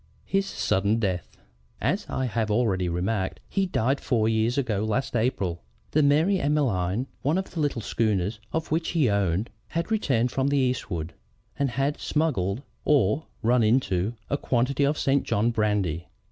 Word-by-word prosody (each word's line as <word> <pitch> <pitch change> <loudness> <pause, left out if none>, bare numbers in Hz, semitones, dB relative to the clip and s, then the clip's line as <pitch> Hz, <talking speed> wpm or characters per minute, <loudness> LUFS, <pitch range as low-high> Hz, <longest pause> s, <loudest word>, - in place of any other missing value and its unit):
HIS 195 0 0
SUDDEN 100 +3 +1
DEATH 95 -6 -2 0.4
"As - - 0
I 130 - -1
have 115 -2 -1
already 100 -5 +1
remarked, 95 +3 -1
he 195 -1 0
died 135 -4 0
four 115 -4 +1
years 115 +2 +1
ago 110 -7 0
last 110 +4 -1
April. 105 -8 0 0.3
The 155 - +3
Mary 155 +7 +3
Emmeline, 125 - +1 0.2
one 150 +6 +1
of 190 - -3
the 170 - -5
little 145 -7 0
schooners 105 -2 0
in 160 - 0
which 165 +1 -1
he 135 -9 +4
owned, 100 +1 0 0.2
had 170 +6 -3
returned 130 - +1
from 135 0 0
the 140 0 +2
eastward, 105 - -1 0.5
and 140 -1 +2
had 135 +4 -1
smuggled, 130 - 0 0.2
or 140 0 +2 0.2
'run 120 +2 +4
in' 110 -3 +2
a 140 - 0
quantity 135 +2 +1
of 145 +2 +1
St. 135 0 +2
John 110 +4 +1
brandy. 105 -7 0
120 Hz, 160 wpm, -26 LUFS, 100-140 Hz, 0.5 s, he